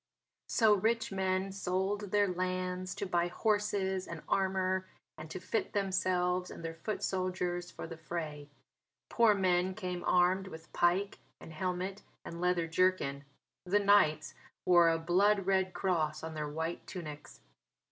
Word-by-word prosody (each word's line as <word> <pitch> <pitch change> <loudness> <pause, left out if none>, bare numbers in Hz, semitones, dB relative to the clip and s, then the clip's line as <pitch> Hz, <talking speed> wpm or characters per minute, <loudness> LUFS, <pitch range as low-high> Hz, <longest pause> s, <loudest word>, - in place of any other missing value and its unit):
So 220 -3 +5
rich 225 +3 +1
men 190 0 0
sold 195 +2 -2
their 205 +1 +3
lands 185 0 -2
to - - -3
buy 175 -2 +1
horses 195 -1 0
and 170 -2 -7
armour 190 -1 0 0.3
and 155 0 -9
to 185 - -5
fit 205 +5 -2
themselves 185 -2 0
and 165 - -8
their 165 - -3
foot 185 +6 -4
soldiers 180 -1 -1
for - - -8
the 165 0 -8
fray. 150 -3 -5 0.6
Poor 230 -3 +4
men 185 -1 +1
came 180 -3 -4
armed 180 +2 +3
with 160 -3 -11
pike 180 +4 +1 0.2
and 160 - -11
helmet 185 +3 -3 0.2
and 170 0 -7
leather 180 -1 +2
jerkin. 165 -5 +1 0.4
The 195 +3 +3
knights 200 -7 +3 0.3
wore 175 -2 +6
a 165 - +2
blood 190 +4 +2
red 190 -1 +2
cross 160 -5 -1
on 160 0 -5
their 150 -1 -3
white 160 +3 -4
tunics. 155 -5 -8
185 Hz, 145 wpm, -32 LUFS, 170-190 Hz, 0.6 s, wore